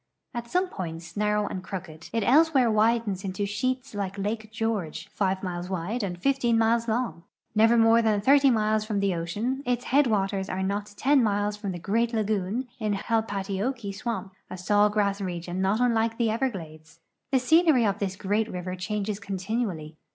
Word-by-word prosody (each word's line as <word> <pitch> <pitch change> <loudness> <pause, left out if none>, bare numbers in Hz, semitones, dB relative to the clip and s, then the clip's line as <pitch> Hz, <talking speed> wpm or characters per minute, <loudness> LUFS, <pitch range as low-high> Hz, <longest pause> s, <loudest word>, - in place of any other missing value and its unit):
At 235 -1 -5
some 365 +5 +1
points 165 - -7
narrow 210 0 +1
and 185 -2 -5
crooked, 165 -5 -8
it 230 -2 0
elsewhere 270 -1 +4
widens 215 -3 +1
into 195 +1 -2
sheets 255 +5 -2
like 200 -1 -4
lake 215 +2 -3
George, 220 -7 -3
5 190 -1 -1
miles 180 -1 -4
wide 190 +6 -2
and 180 -4 -3
15 245 0 +2
miles 230 +1 +2
long. 230 -5 -1 0.3
Never 225 +2 +5
more 225 0 +5
than 215 -2 +2
30 275 +5 +5
miles 215 -2 +2
from 215 -2 -2
the 200 -1 +1
ocean, 205 +11 -2
its 245 -2 -1
headwaters 205 -8 +1
are 190 +1 -2
not 200 +2 -2
10 280 0 +4
miles 205 -1 +1
from 210 -2 -4
the 175 - -5
great 230 +7 0
lagoon 215 +2 -1
in 215 -2 0
Halpatiokee 205 +1 -2
swamp, 210 -2 -4 0.2
a 185 - -6
saw 205 +3 +3
grass 205 -1 0
region 175 0 -4
not 195 +3 +1
unlike 230 -2 +1
the 230 -2 +1
Everglades. 165 -9 -4 0.3
The 270 - +4
sceneiy 295 -2 +4
of 200 0 -1
this 190 -2 -2
great 210 +3 0
river 180 0 -4
changes 200 +2 -3
continually. 190 -6 -3
210 Hz, 175 wpm, -26 LUFS, 190-230 Hz, 0.3 s, Never